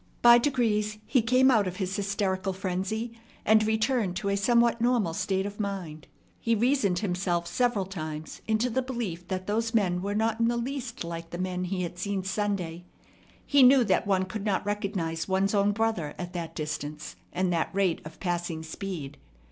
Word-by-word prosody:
By 240 0 +9
degrees 220 -5 +1
he 255 - +3
came 255 +3 +4
out 215 -5 +3
of 180 - -4
his 190 0 -2
hysterical 195 -2 -1
frenzy, 195 +5 -3 0.3
and 220 0 +5
returned 220 -2 +1
to 200 +2 -2
a 200 - +2
somewhat 235 +3 +3
normal 235 -8 +2
state 190 +3 -1
of 205 +1 -6
mind. 185 -7 -4 0.3
He 230 0 +1
reasoned 230 -5 +2
himself 180 -3 -1
several 240 -1 +1
times 155 -4 -6
into 220 +3 +1
the 260 - +1
belief 230 -10 -4
that 185 -1 -3
those 225 +3 -1
men 180 -5 +2
were 200 +2 -2
not 225 +1 +1
in 230 - +3
the 240 0 +1
least 245 -2 -4
like 165 0 -6
the 175 - -6
men 180 0 -2
he 180 0 -2
had 175 0 -6
seen 195 0 -2
Sunday. 190 -4 -2 0.6
He 285 -1 +4
knew 255 0 +7
that 195 -1 +1
one 190 -2 +2
could 210 +2 -5
not 200 -3 0
recognize 195 -6 -2
one's 195 +1 +1
own 200 0 +3
brother 205 -8 -1
at 175 -1 -6
that 170 -2 -5
distance 150 0 -5 0.2
and 185 -1 0
that 165 - 0
rate 195 -3 +1
of 155 +1 -11
passing 175 -3 -2
speed. 160 -3 -6
200 Hz, 185 wpm, -28 LUFS, 180-225 Hz, 0.6 s, By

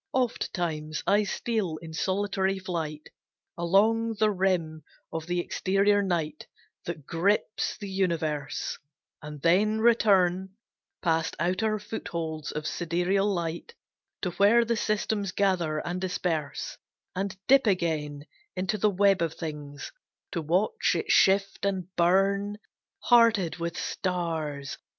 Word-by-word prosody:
Ofttimes 170 -11 -2
I 205 +1 +3
steal 200 -6 -2
in 160 0 -10
solitary 195 +2 0
flight 165 -5 -4 0.5
Along 220 +6 +2
the 215 0 +2
rim 180 -5 0 0.3
of 160 0 -4
the 175 0 0
exterior 195 +3 +2
night 165 -5 -2 0.4
That 160 -5 -6
grips 200 +7 0
the 205 - -7
universe; 165 -7 -2 0.4
And 150 -1 -9
then 205 +6 +3
return, 190 -5 +3 0.5
Past 165 -2 +1
outer 185 +6 0
footholds 165 -7 -5
of 150 0 -5
sidereal 180 +4 0
light, 170 - -4 0.5
To 180 - 0
where 210 +6 +4
the 235 0 +1
systems 210 -2 -1
gather 185 -6 +1
and 180 +1 -3
disperse; 165 -5 -2 0.4
And 190 0 -3
dip 270 -2 +5
again 155 -6 -1 0.3
into 190 +3 -1
the 210 - +4
web 195 -1 +3
of 165 -1 -1
things, 150 -3 -7 0.4
To 170 - -2
watch 185 - +1
it 430 -1 -1
shift 195 +1 +3
and 190 -2 -2
burn, 195 +4 +2 0.4
Hearted 230 -8 +4
with 170 0 -4
stars. 160 -6 -3
185 Hz, 120 wpm, -27 LUFS, 165-205 Hz, 0.5 s, dip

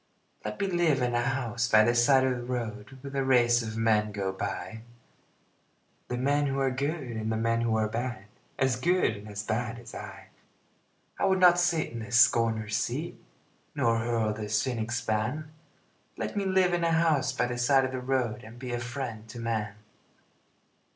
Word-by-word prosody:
Let 105 0 -5
me - - +1
live 175 -6 +2
in 120 -1 0
a 120 - +2
house 120 -2 -1
by 110 -1 +6
the 120 - +3
side 130 +3 +4
of 130 -1 +1
the 120 - -6
road 120 0 -5
Where 140 0 -7
the 135 -1 -1
race 120 -2 +4
of 110 -1 -5
men 110 -2 +2
go 100 -2 -2
by 100 +3 -5 1.3
The 125 - -3
men 145 +3 +1
who 135 0 -2
are 135 -1 +1
good 145 +5 -2
and 110 -3 -4
the 110 - 0
men 115 +1 +1
who 115 -1 +1
are 110 -1 +1
bad, 115 -2 -4 0.3
As 130 -2 +1
good 175 -4 +2
and 105 +1 -10
as 105 0 -5
bad 115 +2 -2
as 120 - -12
I. - - -9 0.9
I - - +2
would 190 -1 +3
not 175 -1 +6
sit 175 -3 +1
in 120 - -6
the 115 +2 -8
scorner's 115 -2 +3
seat 140 +10 -3 0.6
Nor 115 -1 +2
hurl 115 -2 0
the 105 -1 -6
cynic's 120 +2 -1
ban 120 +9 -2 0.7
Let - - -4
me 200 -1 -1
live 190 -1 +3
in 175 -1 0
a 165 -1 +2
house 160 -4 +2
by 130 - 0
the 120 0 -4
side 135 +2 +4
of 130 - -3
the 130 -1 -4
road 125 -4 -1
And 115 +2 -12
be 125 -1 -5
a 120 - -1
friend 120 -3 -6
to 120 - -8
man. 110 -3 -2
120 Hz, 195 wpm, -28 LUFS, 110-135 Hz, 1.3 s, by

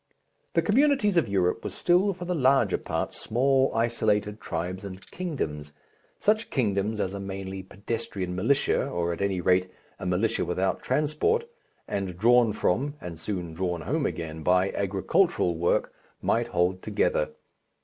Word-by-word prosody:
The - - +3
communities 250 -3 +3
of 170 -8 +3
Europe 95 +2 +1
were - - -3
still 180 +3 +2
for 180 -1 -7
the 180 - -1
larger 130 - +3
part - - -3
small 130 +3 +2
isolated 110 -2 0
tribes 90 +3 -4
and 95 -2 -7
kingdoms, 75 - -4 0.5
such 215 +2 +2
kingdoms 105 -3 0
as 95 -1 -1
a 100 - -4
mainly 95 0 -5
pedestrian 100 -1 -4
militia, 135 +10 +2
or 85 0 -1
at 85 - -6
any 95 -2 0
rate 90 +1 +3 0.3
a 90 - -4
militia 105 +6 +1
without 90 +2 -1
transport, 155 - +1 0.4
and 95 -3 -3
drawn 120 +2 +5
from 130 +8 0
(and 85 -2 -8
soon 90 -3 -4
drawn 90 0 -2
home 150 - 0
again 80 -1 -5
by) 90 +4 +3
agricultural 100 - +1
work, 85 +1 +1 0.3
might - - +1
hold 90 +1 0
together. 100 -7 0
100 Hz, 150 wpm, -27 LUFS, 90-135 Hz, 0.5 s, drawn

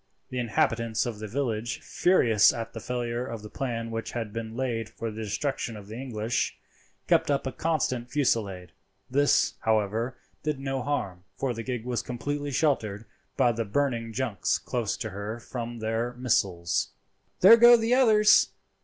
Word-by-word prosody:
The 125 - -2
inhabitants 115 -2 0
of 115 -4 -4
the 110 - -5
village, 115 -1 -2
furious 115 - +4
at 115 -1 -6
the 115 - -6
failure 120 +1 -3
of 115 -4 -6
the 105 - -9
plan 115 -3 -3
which 115 0 -4
had 115 -4 -4
been 115 0 -5
laid 115 -4 -2
for 115 0 -5
the 110 +1 -7
destruction 115 +1 -2
of 105 - -10
the 110 - -7
English, 120 -3 -2 0.5
kept - - +3
up 140 -1 +1
a 130 - -2
constant 130 -7 -1
fusillade. 100 - 0 0.4
This, 145 +2 +3
however, 110 +3 0 0.2
did 150 -3 -2
no 135 -1 -2
harm, 100 -10 -3
for 135 -2 -1
the 115 - -5
gig 125 -1 -4
was 125 -1 -1
completely 145 +4 -4
sheltered 115 -8 0 0.3
by 125 -3 +4
the 115 0 -2
burning 115 0 -1
junks 120 -3 0
close 120 -5 -2
to 110 - -5
her 105 +4 -5
from 120 0 -6
their 115 +2 -2
missiles. 100 -9 0 0.5
"There 200 +5 +10
go 240 +1 +9
the 225 +1 +1
others!" 215 -5 +6
120 Hz, 165 wpm, -27 LUFS, 110-135 Hz, 0.5 s, There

